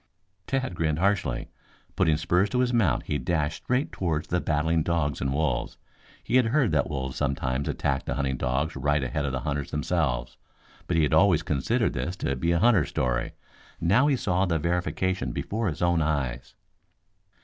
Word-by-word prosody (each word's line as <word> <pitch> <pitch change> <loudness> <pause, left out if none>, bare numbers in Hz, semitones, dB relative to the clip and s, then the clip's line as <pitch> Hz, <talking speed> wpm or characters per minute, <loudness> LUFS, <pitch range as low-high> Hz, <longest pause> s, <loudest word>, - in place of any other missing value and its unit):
Tad 130 -5 -1
grinned 80 -3 0
harshly. 95 -9 0 0.4
Putting 80 -2 +3
spurs 90 +5 +1
to 125 +2 +1
his 125 -1 +1
mount 100 - +2
he 75 - -2
dashed 75 +2 -1
straight 125 +4 0
toward 80 -5 -2
the 90 0 -1
battling 80 +1 +1
dogs 80 -3 -1
and 65 +1 0
wolves. 75 +2 -1 0.5
He 125 - +2
had 125 -3 +4
heard 130 - +2
that 70 -3 +1
wolves 65 -3 -3
sometimes 70 -1 -1
attacked 70 -2 -1
the - - -1
hunting 70 -2 -1
dogs 65 +5 -1
right 70 +1 +1
ahead 70 +3 -2
of 70 - -1
the 65 -1 -3
hunters 70 0 -3
themselves, 65 -5 -1 0.5
but 85 - 0
he 80 - +4
had 75 - +1
always 85 0 +4
considered 110 - 0
this 90 - -3
to 70 - -2
be 85 +6 0
a 85 - +3
hunter's 100 -4 +3
story. 60 -1 -1 0.5
Now 105 - +3
he 145 - +3
saw 95 -5 0
the 85 -2 +1
verification 85 -3 -1
before 110 - -2
his 85 -1 -2
own 85 -1 +3
eyes. 70 -6 -2
80 Hz, 180 wpm, -26 LUFS, 70-90 Hz, 0.5 s, had